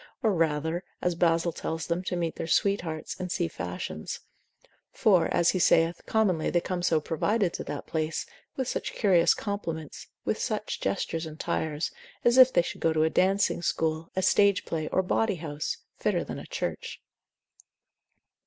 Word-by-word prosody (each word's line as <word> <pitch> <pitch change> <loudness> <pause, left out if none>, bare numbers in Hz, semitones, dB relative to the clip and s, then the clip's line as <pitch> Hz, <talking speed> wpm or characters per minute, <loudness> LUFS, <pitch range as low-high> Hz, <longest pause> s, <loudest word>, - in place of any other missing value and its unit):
or 220 - +4
rather, 160 +1 0 0.2
as 180 - 0
Basil 170 0 +2
tells 160 -1 -4
them, 170 +2 -1
to 180 - -1
meet 170 -2 -2
their - - -4
sweethearts, 170 -4 0
and 180 -1 -4
see 175 - 0
fashions; 90 - -5 0.7
for, 190 -6 +4
as 170 - +4
he 185 - -1
saith, 165 0 +3
commonly 195 -8 +2
they 175 - +2
come 180 +1 -3
so 165 -2 +3
provided 180 +5 0
to - - -4
that - - -5
place, 160 0 -2 0.3
with 260 -2 -2
such - - -3
curious 180 -6 +4
compliments, 165 -7 -5 0.2
with - - 0
such - - -2
gestures 160 +11 -1
and 155 0 -10
tires, 155 0 -1 0.3
as 240 +2 +5
if 260 0 +9
they 175 - +3
should - - -6
go 165 - +3
to 155 0 +2
a 160 - +2
dancing 190 -1 +2
school, 160 -1 -1
a 190 - 0
stage 200 0 +4
play, 155 -2 -2
or 190 - +1
bawdy 205 +2 +1
house, 150 -3 -4 0.2
fitter - - +1
than - - -6
a - - -10
church. - - -4
170 Hz, 170 wpm, -28 LUFS, 160-185 Hz, 0.7 s, if